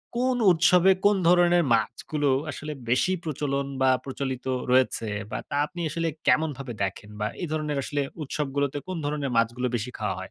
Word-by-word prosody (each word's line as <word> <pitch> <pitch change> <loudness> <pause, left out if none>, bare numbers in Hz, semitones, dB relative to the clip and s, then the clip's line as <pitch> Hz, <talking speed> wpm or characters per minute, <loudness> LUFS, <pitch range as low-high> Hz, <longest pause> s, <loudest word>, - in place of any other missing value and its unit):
কোন 250 +1 +1
উৎসবে 180 +2 +5
কোন 205 0 +6
ধরণের 175 -1 +5
মাছগুলো 135 +6 0 0.2
আসলে 150 +3 -6 0.2
বেশি 130 +9 +2
প্রচলন? 140 -3 -2 0.2
বা 130 - +5 0.2
প্রচলিত 135 -1 -4 0.3
রয়েছে? 125 -3 +2 0.2
বা - - -2
তা - - -3
আপনি 175 +3 -8
আসলে 165 +1 -2 0.2
কেমনভাবে 140 -5 +1
দেখেন? 100 +2 -4
বা 105 - 0
এই 175 - -2
ধরনের 150 -2 -1
আসলে 145 +1 -2 0.2
উৎসবগুলোতে 140 0 -2
কোন 185 - -4
ধরণের 145 -3 -2
মাছগুলো 120 +2 +1
বেশি 120 +2 -3
খাওয়া 105 -2 -2
হয়? - - -7
145 Hz, 165 wpm, -26 LUFS, 125-165 Hz, 0.3 s, কোন